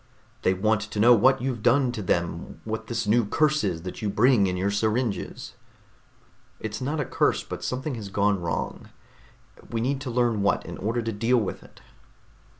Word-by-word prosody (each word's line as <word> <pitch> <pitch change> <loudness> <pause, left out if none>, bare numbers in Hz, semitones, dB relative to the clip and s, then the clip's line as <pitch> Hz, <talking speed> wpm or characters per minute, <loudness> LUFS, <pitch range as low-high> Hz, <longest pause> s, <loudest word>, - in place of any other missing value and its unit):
"They 95 - +2
want 110 +2 +1
to 105 0 -5
know 120 +3 +7
what 130 +3 +4
you've 130 -4 -2
done 125 +2 +3
to 110 - -5
them, 85 -2 -2
what 110 0 -4
this 115 -1 -2
new 115 +3 +3
curse 150 +7 +1
is 85 -5 -2
that 90 - -7
you 105 - -1
bring 105 0 +4
in 90 0 -2
your 95 +2 0
syringes." 110 0 -2 1.1
"It's 110 +1 -5
not 145 +4 -2
a 145 - 0
curse, - - +1
but - - -7
something 130 +3 -3
has 110 -4 -6
gone 100 -1 +1
wrong. 85 -1 -4 0.8
We 115 - -2
need 135 +4 -1
to 130 - -4
learn 120 -3 +1
what, 100 - +1
in - - -7
order 115 +4 -1
to 115 - -2
deal 115 +4 +2
with 110 -5 -2
it." - - -18
110 Hz, 190 wpm, -26 LUFS, 100-125 Hz, 1.1 s, know